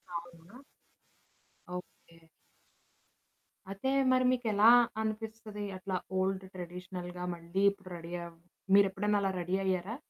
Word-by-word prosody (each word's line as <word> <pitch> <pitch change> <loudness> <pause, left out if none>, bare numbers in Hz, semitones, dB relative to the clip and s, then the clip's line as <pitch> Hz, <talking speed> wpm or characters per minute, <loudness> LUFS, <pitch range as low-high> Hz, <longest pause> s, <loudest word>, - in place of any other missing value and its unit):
అవునా! 170 +8 -9 1.2
ఓకే. 165 -2 -13 1.5
అయితే, 200 +7 -2 0.2
మరి 255 0 +4
మీకెలా 225 -3 +4 0.3
అనిపిస్తది 220 -1 -4
అట్లా 185 0 -2 0.2
ఓల్డ్ 190 0 0
ట్రెడిషనల్‌గా 180 0 -6
మళ్ళీ 170 +4 -2
ఇప్పుడు 195 -2 -13
రెడీ 170 +1 -8
అవ్ 170 -1 -12 0.4
మీరెప్పుడన్న 200 +1 +3
అలా 195 -1 +1
రెడీ 180 +2 -1
అయ్యారా? 190 +4 -1
190 Hz, 100 wpm, -32 LUFS, 175-210 Hz, 1.5 s, మరి